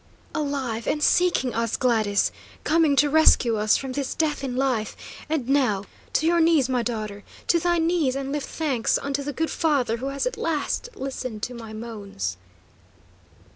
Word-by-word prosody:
"Alive, 265 -7 -2
and 300 - 0
seeking 345 -9 +3
us, 230 0 -1
Gladys! 220 -5 +2 0.3
Coming 315 -2 +3
to 290 +1 +5
rescue 280 -6 +5
us 210 0 +3
from 265 -1 -5
this 275 0 -3
death 300 -3 0
in 255 -2 -3
life, 255 -5 0 0.3
and 300 -6 -1
now 255 -8 +2 0.3
to 315 - +2
your 340 +1 +4
knees, 320 -5 +4
my 255 -2 +1
daughter; 215 -4 -4 0.3
to 340 - +5
thy 345 +1 +1
knees, 325 -5 +1
and 275 0 -3
lift 295 -1 -3
thanks 275 -8 0
unto 280 0 -2
the 285 +1 -3
good 320 +3 -2
Father 275 -8 +1
who 260 +3 -4
has 275 0 -2
at - - -2
last 330 +9 -1
listened 255 -5 -5
to 250 - -3
my 230 -2 -8
moans!" 205 - -5
270 Hz, 175 wpm, -24 LUFS, 230-300 Hz, 0.3 s, to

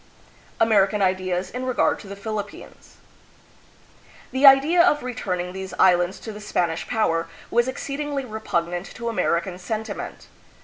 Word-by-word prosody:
American 210 -2 +3
Ideas 185 -1 0
in 250 +1 -5
Regard 255 -1 +1
to 205 - -11
the 200 - -7
Philippines. 210 +1 -7 1.4
The 265 +2 +5
idea 285 +6 +7
of 300 -5 +3
returning 185 -8 -3
these 190 0 -6
islands 180 0 +4
to 220 - -6
the 210 - -9
Spanish 170 -5 -1
power 170 -8 0 0.2
was 240 +1 +3
exceedingly 280 +1 -3
repugnant 175 -5 -2
to 235 -1 -3
American 180 -4 -1
sentiment. 220 +4 -5
210 Hz, 130 wpm, -23 LUFS, 185-250 Hz, 1.4 s, idea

